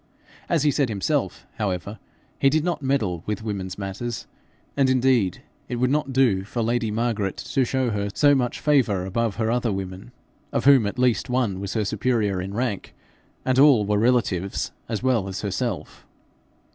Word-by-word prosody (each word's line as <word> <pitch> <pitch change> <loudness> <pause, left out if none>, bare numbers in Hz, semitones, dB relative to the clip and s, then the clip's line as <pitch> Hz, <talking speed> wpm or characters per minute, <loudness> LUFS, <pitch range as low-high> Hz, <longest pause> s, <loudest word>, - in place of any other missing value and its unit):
As 165 -5 +2
he 150 - +4
said 140 -3 +1
himself, 100 -3 -1
however, 100 0 -3 0.4
he 135 - +5
did 155 +2 +1
not 170 -3 -1
meddle 110 - 0
with 105 0 -3
women's 100 -4 -4
matters, 105 +4 -5 0.5
and 135 -2 +3
indeed 125 -7 +2 0.3
it 125 - -2
would 125 +2 +1
not 145 -1 0
do 125 -8 +3
for 115 +3 -3
lady 115 0 0
Margaret 110 -3 -1
to 135 - 0
show 130 -1 0
her 100 -1 -2
so 145 +7 +4
much 125 -3 0
favour 120 -11 +2
above 110 +2 -1
her 110 0 0
other 120 -1 0
women, 95 +3 -6 0.4
of - - -1
whom 135 -6 +6
at 100 - -5
least 125 0 +1
one 125 -7 0
was 100 +2 -5
her 110 -2 +1
superior 105 -4 0
in 95 +2 -6
rank, 115 -4 -3 0.5
and 130 0 +2
all 135 -7 +6
were 105 0 +1
relatives 105 -6 0 0.2
as 110 0 -3
well 120 -7 +1
as 95 -1 -5
herself. 105 +1 -3
115 Hz, 175 wpm, -24 LUFS, 100-130 Hz, 0.5 s, whom